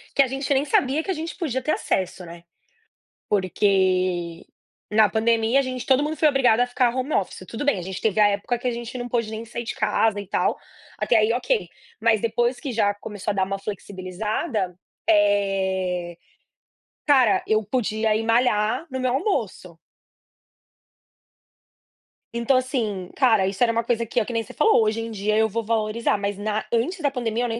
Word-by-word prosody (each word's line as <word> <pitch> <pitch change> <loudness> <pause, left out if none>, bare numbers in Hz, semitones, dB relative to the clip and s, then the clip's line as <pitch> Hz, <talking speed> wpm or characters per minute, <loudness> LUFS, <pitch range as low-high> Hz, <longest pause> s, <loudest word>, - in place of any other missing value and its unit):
que - - +5
a 270 - +3
gente 270 +2 -1
nem 270 +1 +2
sabia 285 +1 +1
que - - -9
a - - +1
gente 325 +1 -5
podia 265 -8 -2
ter 305 - 0
acesso, 185 0 -2
né. 170 0 -11 0.9
Porque 185 -3 +1 0.5
na 215 0 +5
pandemia 225 +3 +2
a - - +4
gente 255 -2 -5
todo 270 +1 +3
mundo 305 +1 -2
foi 310 - +4
obrigado 265 -6 +3
a 245 - +3
ficar 245 -1 +1
home 260 +3 -2
office, 185 -1 -2
tudo 230 - -5
bem, 215 -11 +1
gente 190 +1 -6
teve 215 -1 +1
a 210 - +7
época 205 +4 -1
que 250 - -3
a - - +1
gente 235 +1 -6
não 245 0 -4
pôde 230 -2 -1
nem 220 +1 -5
sair 235 +1 -6
de 240 +1 -4
casa 215 0 +1
e 200 - -11
tal, - - +1 0.4
até 235 - +3
aí 215 +1 +3
ok, 425 - 0 0.3
mas 220 -2 +3
depois 240 +2 0
que 280 - -4
já 205 -3 +1
começou 205 0 -5
a - - -2
dar 190 -1 +1
uma 195 +1 -3
flexibilizada, 195 - -4 0.3
eh, 190 -4 +1 0.9
cara, 260 -7 +4
eu 215 0 +2
podia 220 -1 0
ir 220 - -1
malhar 225 +2 +2
no 260 - -3
meu 255 -1 0
almoço. 230 - -2 2.6
Então 235 +3 +2
assim, 225 -8 -2
cara, 220 -8 +4
isso 195 +4 0
era 235 - +3
uma 230 0 0
coisa 230 0 0
que 235 - 0
é 220 - 0
que - - -6
nem 230 -1 0
você - - -13
falou, 435 - +4
hoje 220 +1 0
em 225 - -5
dia 210 -1 -1
eu 220 0 +3
vou 230 +3 -2
valorizar, 220 +1 0
mas 200 0 -3
na 215 +1 -2
antes 255 +11 0
da 290 - +2
pandemia 240 -3 -2
eu - - 0
nem 230 0 -3
225 Hz, 195 wpm, -23 LUFS, 200-250 Hz, 2.6 s, a